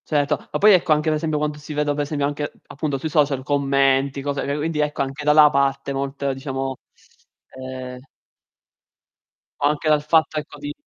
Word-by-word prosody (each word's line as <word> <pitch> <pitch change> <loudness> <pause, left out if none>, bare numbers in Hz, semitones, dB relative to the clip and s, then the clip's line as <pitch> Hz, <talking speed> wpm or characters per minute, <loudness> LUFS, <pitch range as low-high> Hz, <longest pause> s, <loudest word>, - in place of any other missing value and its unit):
Certo. 145 -1 0
Ma - - -1
poi 210 0 +7
ecco 175 -3 +4
anche 150 +1 -1
per - - +2
esempio 155 -1 -1
quando 150 0 -2
si 150 +1 -8
vede 150 0 0
per 145 - -2
esempio 145 -1 -1
anche 145 +1 -3 0.2
appunto 145 -1 -3
sui 135 - -4
social 145 -3 +1
commenti, 140 -1 +1
cose 140 0 -2 0.2
quindi 155 +1 -2
ecco 150 -1 0
anche 135 +2 -6
da 150 - +4
là 150 0 +7
parte 140 0 0
molto 140 0 -2
diciamo 135 0 -4 0.9
eh 130 -1 -7 1.6
O - - +5
anche 150 +1 0
dal 150 -1 +4
fatto 155 0 +2
ecco 150 - -10
di 295 0 -6
145 Hz, 180 wpm, -22 LUFS, 135-150 Hz, 1.6 s, poi